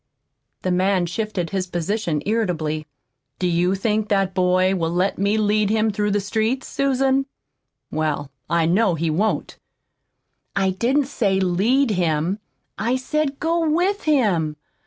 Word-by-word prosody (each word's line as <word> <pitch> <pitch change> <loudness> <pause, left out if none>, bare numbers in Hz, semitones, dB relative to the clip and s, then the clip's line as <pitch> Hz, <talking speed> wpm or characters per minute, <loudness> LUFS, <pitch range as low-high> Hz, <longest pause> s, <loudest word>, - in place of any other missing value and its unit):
The 185 - 0
man 185 0 +2
shifted 185 -1 -3
his 190 -2 -1
position 175 -2 -2
irritably. 160 -8 -1 0.5
"Do 180 - 0
you 175 +2 +2
think 210 +2 0
that 195 -2 +1
boy 185 0 +2
will 165 -4 0
let 180 +3 0
me 200 +2 +2
lead 210 -1 +2
him 220 0 +2
through 210 0 -1
the 205 0 +1
streets, 220 +6 -1
Susan? 270 0 +1 0.6
Well, 150 -3 -2 0.2
I 170 -1 +2
know 185 +2 +3
he 165 0 -1
won't." 205 +8 -1 1.0
"I 195 -1 +2
didn't 255 +9 +1
say 200 -7 0
'lead 215 +9 +2
him.' 175 +1 0 0.4
I 235 +4 +1
said 275 +2 -1
go 330 0 +1
WITH 365 +6 +1
him. 200 - +2
200 Hz, 140 wpm, -22 LUFS, 175-230 Hz, 1.0 s, know